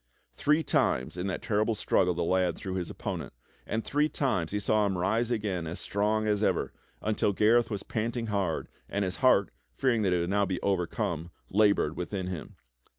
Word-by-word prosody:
Three 150 +2 +2
times 65 - +1
in 90 +2 -3
that 95 - -3
terrible 110 0 +1
struggle 90 -3 +2
the 85 - 0
lad 90 -1 +2
threw 95 - -5
his 90 -2 -3
opponent, - - -5 0.3
and 110 +1 -1
three 150 +2 +1
times 105 - 0
he 105 - 0
saw 105 0 +2
him 95 -2 -1
rise 110 +6 +1
again 100 -8 -1
as 85 - -5
strong 105 +2 0
as 105 -1 +1
ever - - +1 0.3
until 105 -1 +1
Gareth 115 +4 +4
was 105 -2 -3
panting 115 +1 -2
hard, 100 -7 -1 0.2
and 100 0 0
his 90 - -3
heart, 100 -7 +4 0.2
fearing 120 - +2
that 95 -3 +2
he 90 - +3
w^ould 85 0 -1
now 100 0 +2
be 90 -1 -2
over 95 -3 +1
come, 85 -6 -3 0.2
labored 100 -6 +3
wdthin 90 +1 -4
him. 90 -4 -6
100 Hz, 195 wpm, -29 LUFS, 90-110 Hz, 0.3 s, Gareth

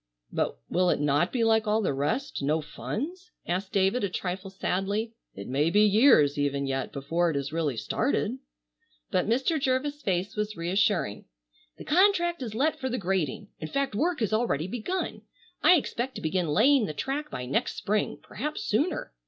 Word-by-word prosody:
"But - - -1
will 180 0 +2
it - - +2
not 145 +4 +2
be 240 -3 0
like 220 -1 +3
all 210 +1 +3
the 165 - +1
rest, 150 - -2
no 150 +3 +1
funds?" 345 - -5 0.2
asked 185 +3 -2
David 195 +5 +2
a 200 - +1
trifle 185 +1 -4
sadly. 195 +4 -2 0.2
"It 100 - -7
may 145 +5 +1
be 205 +4 +4
years 205 - +5
even 140 -1 0
yet 135 -1 -2
before 165 +5 0
it 160 - -2
is 140 +2 -3
really 155 -7 -1
started." - - -1 0.7
But - - +1
Mr. 270 +7 +1
Jervis' 280 +3 0
face 190 -2 -1
was 210 0 -2
reassuring. 175 - 0 0.5
"The - - -10
contract 345 -1 +3
is 225 -4 -5
let 290 +6 +1
for 260 - -2
the 250 - -1
grading. 190 - -2
In 155 - -4
fact 275 - -1
work 315 +6 0
has 215 -1 0
already 215 -10 +1
begun. 245 - -3 0.4
I 360 - +7
expect 260 -4 -2
to - - -6
begin 170 +2 0
laying 225 - +4
the 155 - -4
track 290 - -3
by 125 - -5
next 130 - -1
Spring, 210 +1 -1
perhaps 300 +6 -4
sooner. 285 - -1
205 Hz, 180 wpm, -27 LUFS, 160-260 Hz, 0.7 s, I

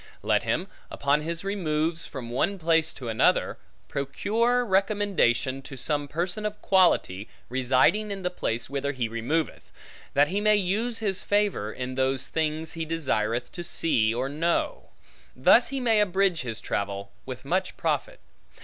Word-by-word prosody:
Let - - +2
him, - - -1 0.2
upon 140 +1 +1
his 165 +3 -3
removes 165 -4 -1
from 120 -4 -7
one 195 +11 0
place 165 -2 +2
to 125 - -8
another, 110 -1 +2 0.3
procure 230 - 0
recommendation 190 - +1
to 135 0 -10
some 145 +2 -1
person 175 +8 -3
of 210 0 -3
quality, 175 - +2 0.2
residing 130 - +2
in 195 -1 -5
the 180 - -1
place 115 -9 -2
whither 140 +1 -2
he 125 -4 -1
removeth; 120 +9 -2 0.4
that 145 +1 +4
he 200 +2 -1
may 215 0 +5
use 210 +5 0
his 190 -2 0
favor, 205 - 0
in 125 +2 -5
those 130 0 0
things 160 0 -1
he 165 - -3
desireth 125 -7 -1
to 175 - -6
see 120 -9 +1
or 125 +3 -1
know. 170 - -1 0.5
Thus - - +5
he 275 - -2
may 230 -4 +3
abridge 190 -3 +2
his 115 -4 -3
travel, 100 0 -3 0.2
with 130 0 -7
much 185 +5 -1
profit. - - -1
160 Hz, 155 wpm, -26 LUFS, 130-195 Hz, 0.5 s, may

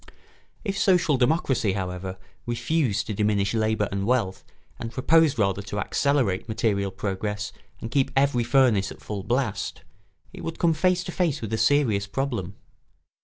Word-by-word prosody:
] - - -32
If 195 -2 -2
social 180 -6 +3
democracy, 130 - +1
however, 95 -1 -4 0.3
refused 120 -2 0
to 110 - -3
diminish 105 0 +1
labour 110 -2 +1
and 100 +1 -2
wealth 115 -7 0 0.4
and 115 - -5
proposed 150 +4 +3
rather 100 -2 +1
to 100 +1 -6
accelerate 120 -5 0
material 100 -3 0
progress 105 +2 -3 0.3
and 115 - -6
keep 135 0 +2
every 135 -3 +3
furnace 120 -6 +3
at - - -11
full 105 -2 -5
blast, 120 -6 -2 0.5
it - - -9
would 165 - -4
come 170 -2 +3
face 180 +3 +2
to 180 - -5
face 170 -5 0
with 110 -1 -5
a - - +1
serious 115 -5 +2
problem. 115 -5 -3
115 Hz, 160 wpm, -25 LUFS, 100-140 Hz, 0.5 s, social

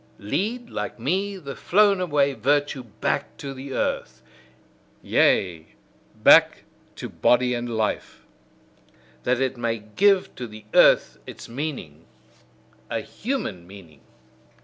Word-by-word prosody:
Lead, 210 - -3
like - - -4
me, 190 - -1
the 140 -6 -8
flown 200 0 +3
away 145 -5 +1
virtue 140 +3 0
back 110 - -3
to 140 -1 -6
the 135 +1 -9
earth - - -3 0.8
yea, 85 -4 +1 0.4
back - - +5 0.3
to - - -6
body 125 0 +2
and 120 0 -3
life: 110 -1 -3 1.0
that 125 0 +1
it 130 -1 -1
may 115 -1 -1
give 185 - +2
to 125 - -5
the 110 -1 -12
earth - - +5
its - - -10
meaning, 115 - -6 0.8
a - - -2
human 150 - -5
meaning! 85 -8 -14
130 Hz, 120 wpm, -24 LUFS, 110-175 Hz, 1.0 s, back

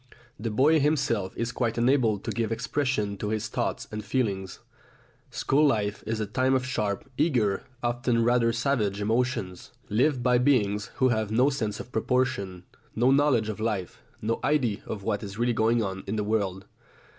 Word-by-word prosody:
The 115 +2 -2
boy 145 +9 +4
himself 140 -10 +1
is 115 0 -1
quite 120 -2 -1
unable 120 -3 +3
to - - -5
give 115 -2 -2
expression 115 -3 -1
to 105 +2 -3
his 110 -1 -2
thoughts - - -2
and 105 0 -5
feelings; 105 -5 -2 0.7
school 145 +3 +1
life 105 -7 +1
is 110 0 -1
a 110 - -1
time 130 +5 +1
of 130 -1 0
sharp, 105 -6 -2
eager, 120 - +1 0.2
often 120 -1 +1
rather 120 0 +3
savage 115 -5 0
emotions, 110 -4 -1 0.2
lived 125 +4 +2
by 125 -1 +4
beings 105 -6 +2
who 130 - +3
have 110 -3 0
no 125 +6 +3
sense 110 -7 -3
of 125 - -9
proportion, 110 -7 -1 0.3
no 120 +4 +3
knowledge 135 -6 +3
of 110 -1 -4
life, 105 -5 -3 0.2
no 115 +2 0
idea 125 -9 +1
of 100 -3 -5
what 100 +1 -1
is 100 -1 -7
really 120 +1 +1
going 115 +1 +2
on 95 -1 -4
in 100 - -2
the 105 - 0
world. 100 -3 -1
115 Hz, 175 wpm, -27 LUFS, 105-130 Hz, 0.7 s, boy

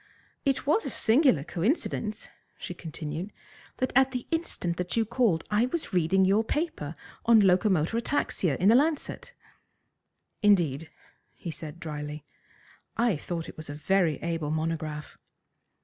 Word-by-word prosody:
"It 275 -2 +1
was 310 +10 +3
a - - -3
singular 240 - +3
coincidence," 210 - -2 0.3
she 180 - -6
continued, 160 +2 -6 0.5
"that 255 - -1
at 265 0 +6
the 250 -1 -3
instant 255 - -2
that 180 +4 -2
you 225 - +3
called 225 -8 +1
I 215 +4 +3
was 315 - -4
reading 185 +2 +3
your 200 +4 +3
paper 225 - -3 0.3
on 230 -1 +7
'Locomotor 190 -1 +3
Ataxia,' 195 - 0
in 190 - +4
the - - +7
Lancet." 310 - 0 1.1
"Indeed," 165 -8 +3 0.6
said 155 -1 -8
he - - -18
drily. 150 -2 -6 0.7
"I 235 -4 +3
thought 165 +2 -4
it - - -11
was 155 -1 -9
a 145 - -5
very 170 0 +2
able 165 -3 -2
monograph." 155 -1 -3
185 Hz, 140 wpm, -28 LUFS, 160-235 Hz, 1.1 s, on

